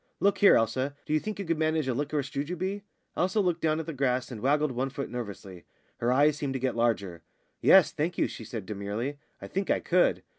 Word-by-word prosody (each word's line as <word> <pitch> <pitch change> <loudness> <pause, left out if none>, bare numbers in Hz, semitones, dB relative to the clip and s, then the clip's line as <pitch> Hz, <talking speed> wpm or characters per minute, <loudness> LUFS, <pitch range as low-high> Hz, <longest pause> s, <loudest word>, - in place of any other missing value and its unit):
"Look 200 0 +2
here, 205 - +7
Elsa, 130 +5 0
do - - -2
you 155 - +4
think 215 +5 -5
you 200 - -4
could 165 -1 -1
manage 155 -2 +1
a 130 - +1
liquorice 145 +1 -2
jujube?" 180 +8 -3 0.3
Elsa 190 +4 +1
looked 180 -4 +1
down 155 0 +1
at 160 - -4
the 165 - -5
grass 130 -2 0
and 110 -4 -7
waggled 145 +2 +2
one 130 +2 -2
foot 140 +1 -5
nervously; 100 -6 -7 0.3
her 120 +1 0
eyes 145 +3 +4
seemed 140 -2 -3
to 130 - -2
get 130 -1 -1
larger. 100 -7 0 0.4
"Yes, 190 -4 +6
thank 165 +3 -2
you," - - +2
she - - -8
said 110 -6 -6
demurely, 105 +8 -4 0.2
"I - - -8
think 195 +1 -3
I - - +3
could." - - +2
140 Hz, 225 wpm, -28 LUFS, 120-160 Hz, 0.4 s, here